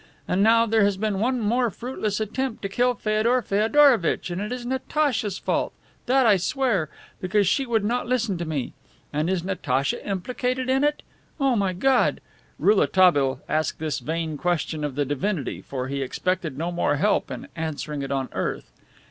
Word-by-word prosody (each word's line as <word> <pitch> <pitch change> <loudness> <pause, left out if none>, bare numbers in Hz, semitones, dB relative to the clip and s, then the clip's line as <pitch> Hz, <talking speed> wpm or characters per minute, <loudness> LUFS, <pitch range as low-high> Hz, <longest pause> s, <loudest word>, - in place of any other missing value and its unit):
And 185 - +1
now 230 +2 +5
there 220 -1 +3
has 200 -1 +2
been 210 -1 -1
one 250 +4 +1
more 235 +3 +1
fruitless 215 -1 -3
attempt 225 +3 -3
to 195 - -2
kill 245 +4 +1
Feodor 225 +4 +1
Feodorovitch 220 - +3
and 175 +3 -3
it 210 - -4
is 250 -1 -4
Natacha's 255 - -1
fault - - -1 0.3
that 260 +1 +4
I 210 -3 +6
swear, 200 - 0 0.3
because 195 +2 +2
she 270 +7 +1
would 225 -3 +1
not 240 +3 -1
listen 235 -5 0
to 170 - -2
me. 145 -5 -3 0.4
And 155 +3 0
is 185 -3 0
Natacha 140 -8 -1
implicated 250 +6 -2
in 265 +2 +2
it? 295 0 0 0.4
O 270 -3 +2
my 195 -3 +1
God" 260 +8 +2 0.4
Rouletabille 180 -9 +3
asked 155 -2 0
this 155 -1 -2
vain 160 -1 -3
question 170 -3 -1
of 145 -3 -3
the 145 0 0
Divinity, 145 +3 -2
for 130 -2 -5
he 140 +1 -3
expected 160 +1 -2
no 170 +3 -2
more 170 -4 +1
help 205 +9 +1
in - - -7
answering 155 -2 -4
it 135 0 -4
on 135 -1 -1
earth. - - -3
200 Hz, 175 wpm, -24 LUFS, 160-245 Hz, 0.4 s, I